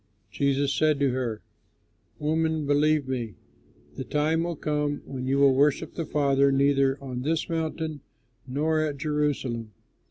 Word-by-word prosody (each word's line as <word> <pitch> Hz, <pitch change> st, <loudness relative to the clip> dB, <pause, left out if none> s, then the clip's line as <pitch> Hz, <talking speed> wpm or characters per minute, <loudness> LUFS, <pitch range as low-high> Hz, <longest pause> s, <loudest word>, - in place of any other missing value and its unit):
Jesus 140 Hz, 0 st, +1 dB
said 155 Hz, 0 st, +2 dB
to 140 Hz, -2 st, +2 dB
her, 120 Hz, -4 st, -3 dB, 0.7 s
"Woman, 160 Hz, 0 st, 0 dB
believe 145 Hz, 0 st, +2 dB
me, 120 Hz, -6 st, -3 dB, 0.6 s
the -, -, -3 dB
time 155 Hz, +4 st, 0 dB
will 170 Hz, 0 st, -2 dB
come 150 Hz, -1 st, -2 dB
when 130 Hz, -1 st, -5 dB
you 135 Hz, +1 st, +2 dB
will 140 Hz, -1 st, +5 dB
worship 140 Hz, +2 st, +2 dB
the 165 Hz, -3 st, -4 dB
Father 140 Hz, -2 st, +3 dB
neither 135 Hz, 0 st, +3 dB
on 125 Hz, -2 st, -5 dB
this 160 Hz, +4 st, -1 dB
mountain 160 Hz, -2 st, -3 dB, 0.5 s
nor 155 Hz, +5 st, 0 dB
at 150 Hz, -2 st, -1 dB
Jerusalem. 140 Hz, -7 st, -2 dB
145 Hz, 145 wpm, -26 LUFS, 135-155 Hz, 0.7 s, will